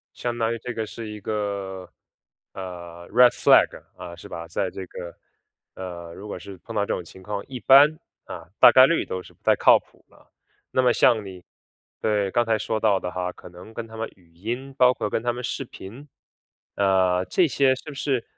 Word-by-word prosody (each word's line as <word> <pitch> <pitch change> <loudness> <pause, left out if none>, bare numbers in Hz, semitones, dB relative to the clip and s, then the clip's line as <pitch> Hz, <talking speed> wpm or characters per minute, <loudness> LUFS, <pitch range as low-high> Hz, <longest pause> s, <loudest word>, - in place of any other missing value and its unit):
相 120 -1 -3
当 115 0 +1
于 115 - -3
这 125 +2 -6
个 110 -1 -3
是 115 +1 -8
一 105 0 -8
个， 100 -3 -4 0.6
呃， 85 -2 -9
red 125 +2 +7
flag， - - +4
啊， 85 -1 -9
是 - - -12
吧。 85 0 -7
在 90 +3 -2
这 95 - -7
个， 85 -1 -9 0.6
呃， 85 -2 -8
如 100 - -10
果 100 - -5
是 95 +2 -10
碰 115 +5 -10
到 105 - +1
这 - - -3
种 90 - -5
情 95 +3 -14
况， 100 +1 -5
一 130 -2 -7
般， 145 +5 +6 0.3
啊， 85 0 -9
大 - - +10
概 130 0 +8
率 170 - +1
都 95 0 -5
是 - - -16
不 - - -33
太 - - +5
靠 - - +6
谱 - - -27
的。 - - -23 0.4
那 130 - +2
么 125 -1 +4
像 110 -3 +3
你 90 -2 -10 0.6
对， 105 -3 0
刚 120 +4 +2
才 115 -1 +1
说 110 0 -2
到 105 -3 +3
的 90 - -4
哈， 90 0 -3
可 - - -13
能 90 +5 -13
跟 115 -1 -5
他 110 0 -12
们 115 0 -3
语 85 -3 -26
音， 120 +9 -5
包 125 -2 +6
括 - - -3
跟 110 - -1
他 120 - 0
们 120 +1 -6
视 130 +2 -3
频， 120 +5 -11 0.7
呃， 95 -2 +2
这 180 - +3
些 130 +1 +3
是 - - -12
不 - - -9
是， 135 -3 -1
105 Hz, 250 characters per minute, -24 LUFS, 90-120 Hz, 0.7 s, 大